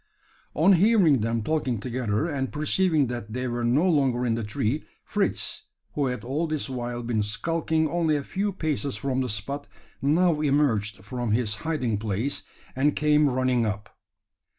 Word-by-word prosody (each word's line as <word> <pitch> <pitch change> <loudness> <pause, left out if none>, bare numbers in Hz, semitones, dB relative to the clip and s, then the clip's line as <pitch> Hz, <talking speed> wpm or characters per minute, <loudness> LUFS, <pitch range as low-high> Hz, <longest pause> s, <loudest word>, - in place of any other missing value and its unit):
On 175 +6 +5
hearing 180 - +5
them 115 0 0
talking 130 -4 0
together, 120 +1 -1
and 135 -5 -2
perceiving 155 0 +2
that 120 -3 -5
they 125 +1 -2
were 120 0 -2
no 135 +10 +3
longer 135 -7 +2
in 115 - +1
the 115 0 -2
tree, 115 +5 -1 0.2
Fritz, - - -2 0.3
who 145 -2 0
had 125 -4 -3
all 145 +7 -1
this 155 -2 -2
while 120 -2 -4
been 115 -2 0
skulking 160 +9 0
only 160 -1 +1
a 145 - -1
few 200 +7 -2
paces 150 -6 -2
from 130 -1 -1
the 130 - -2
spot, 140 +8 -4 0.3
now 155 +2 +3
emerged 115 -9 +1
from 120 0 -2
his 110 -2 0
hiding 125 -9 -1
place, 110 +6 -2 0.3
and 140 +3 +2
came 150 -1 +4
running 130 -1 +1
up. 105 -1 -4
130 Hz, 165 wpm, -26 LUFS, 115-155 Hz, 0.3 s, On